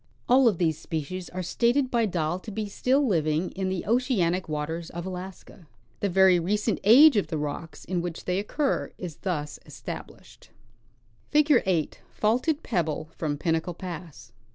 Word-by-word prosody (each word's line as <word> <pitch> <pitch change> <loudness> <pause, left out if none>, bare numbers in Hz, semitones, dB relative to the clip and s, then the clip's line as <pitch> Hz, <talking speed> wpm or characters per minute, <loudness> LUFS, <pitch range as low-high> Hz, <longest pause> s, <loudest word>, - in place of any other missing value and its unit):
All 255 +1 +5
of 210 -6 +2
these 160 -3 0
species 165 +3 -5
are 185 +1 -5
stated 245 +8 +1
by 235 -2 +2
Dall 175 -1 -1
to 200 - -10
be 210 +1 -3
still 260 +7 +1
living 160 - 0
in 190 0 -3
the 185 -2 -3
oceanic 200 - +1
waters 160 +2 -3
of 170 +1 -6
Alaska. 185 -1 -8 0.3
The 200 - 0
very 190 -1 +5
recent 205 +5 0
age 255 +6 +8
of 205 - +1
the 160 - -3
rocks 150 +2 -5
in 180 -1 -1
.which 170 -1 -6
they 180 +1 0
occur 275 +8 -1
is 170 -5 -7
thus 150 -6 -3
established. - - -10 0.8
Figure 300 -3 +4
8 170 -5 0
— - - -33
Faulted 255 +9 +1
Pebble 160 - -2
from 150 -3 -2
Pinnacle 165 +2 -1
Pass. 170 -8 -8
185 Hz, 165 wpm, -26 LUFS, 165-220 Hz, 0.8 s, age